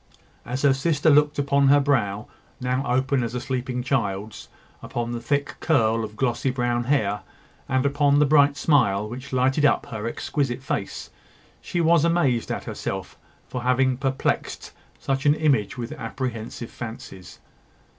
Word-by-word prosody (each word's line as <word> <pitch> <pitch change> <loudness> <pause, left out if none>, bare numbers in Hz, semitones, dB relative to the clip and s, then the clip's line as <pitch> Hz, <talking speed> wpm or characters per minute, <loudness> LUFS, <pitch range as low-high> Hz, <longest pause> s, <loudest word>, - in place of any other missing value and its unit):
As 125 +3 -3
her 140 -2 +5
sister 150 +3 +2
looked 150 +1 +4
upon 140 0 +2
her 145 +1 +6
brow, 110 -8 0 0.3
now 125 +1 -1
open 130 +1 +1
as 115 +1 -4
a - - -1
sleeping 125 0 -3
child's, 105 -5 -2 0.3
upon 120 0 -4
the 120 - -3
thick 140 +4 -1
curl 115 -8 +2
of 105 0 -7
glossy 120 +1 0
brown 120 -2 -1
hair, 105 -7 +1 0.5
and 130 +1 +1
upon 145 0 +3
the 150 - +5
bright 145 0 +4
smile 105 -11 +2
which 125 +5 -8
lighted 130 +3 +2
up 145 - +3
her 110 0 -5
exquisite 130 +1 -2
face, 100 -6 -4 0.5
she 175 - -2
was 165 -1 +4
amazed 155 -9 +1
at - - -3
herself - - -5 0.3
for 125 - -5
having 130 +1 +2
perplexed 135 0 -2 0.3
such 135 +2 -1
an 145 - +5
image 135 -9 +1
with 120 -1 -5
apprehensive 115 -1 -5
fancies. 110 -6 -9
130 Hz, 155 wpm, -24 LUFS, 120-140 Hz, 0.5 s, her